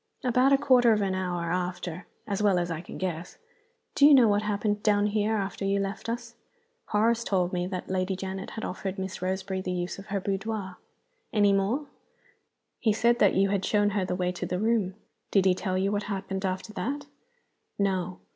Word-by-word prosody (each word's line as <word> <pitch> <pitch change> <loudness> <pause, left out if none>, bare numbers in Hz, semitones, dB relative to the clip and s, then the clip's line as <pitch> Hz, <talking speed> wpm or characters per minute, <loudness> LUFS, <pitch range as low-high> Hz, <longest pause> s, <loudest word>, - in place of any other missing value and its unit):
"About 255 +2 +3
a 275 - +6
quarter 250 -4 +5
of 210 - +1
an 190 -1 0
hour 175 -2 -2
after, 180 0 -3 0.2
as 205 -1 -2
well 200 -3 +4
as 175 -1 -1
I 160 -1 -3
can 170 - -9
guess." 175 -2 -4 0.6
"Do - - +1
you 295 - +8
know 250 -4 +6
what 205 0 +3
happened 210 0 -1
down 205 -1 +3
here 210 +1 +1
after 195 -1 -3
you 195 0 +1
left 195 +3 -3
us?" 235 0 -4 0.5
"Horace 225 +2 +2
told 185 -4 0
me 180 0 -1
that 185 -1 -5
Lady 185 0 -1
Janet 190 +1 -5
had 220 - -5
offered 190 +1 -4
Miss 190 -1 -5
Roseberry 190 +1 -2
the 185 - -3
use 180 +1 -3
of 195 - -11
her 200 0 -1
boudoir." 195 -1 -3 0.5
"Any 205 -2 +4
more?" 210 +10 +1 0.9
"He 220 -3 +2
said 235 +2 +2
that 200 - +4
you 195 +1 +3
had 195 -1 0
shown 205 +1 +2
her 200 -1 0
the 180 0 -2
way 180 0 0
to 180 - -5
the 180 - -2
room." 210 -2 +1 0.3
"Did 195 -2 +3
he 190 - +5
tell 185 0 -2
you 195 +1 +1
what 205 0 0
happened 195 -1 -3
after 190 +3 -3
that?" 285 +6 -3 0.7
"No." 185 -2 0
195 Hz, 205 wpm, -27 LUFS, 185-215 Hz, 0.9 s, you